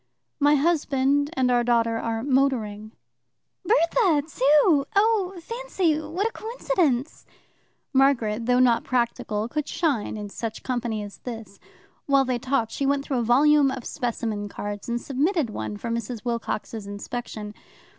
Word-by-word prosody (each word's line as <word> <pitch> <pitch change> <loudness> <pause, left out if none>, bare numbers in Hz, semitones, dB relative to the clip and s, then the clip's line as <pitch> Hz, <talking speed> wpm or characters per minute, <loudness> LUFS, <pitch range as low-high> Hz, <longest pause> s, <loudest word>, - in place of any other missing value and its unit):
"My 290 +1 +5
husband 285 -2 +2
and 255 -3 +1
our 240 -1 +3
daughter 230 -1 +2
are 225 0 -2
motoring." 245 -6 0 0.7
"Bertha 345 -6 +3
too? 290 +1 +4
Oh, 400 -3 +2
fancy, 380 -6 -1
what 330 +7 -3
a - - -5
coincidence!" 360 - -1 0.7
Margaret, 240 -5 +2
though 250 0 +4
not 245 -2 +4
practical, 235 -3 -1
could 300 +4 -3
shine 285 -11 -1
in 205 -1 -6
such 220 +2 -6
company 240 -4 -2
as 205 -1 -10
this. 225 -5 -8 0.5
While 275 -1 +4
they 250 -1 -1
talked, 245 -3 0
she 275 - -1
went 280 0 +1
through 265 -3 -1
a - - 0
volume 280 +4 +5
of 260 -2 -5
specimen 225 -5 -3
cards, 205 +2 -6
and 235 0 -1
submitted 285 - 0
one 210 - -5
for 230 +3 -5
Mrs. 230 0 -4
Wilcox's 225 -2 -3
inspection. 210 +1 -6
255 Hz, 145 wpm, -25 LUFS, 230-295 Hz, 0.7 s, My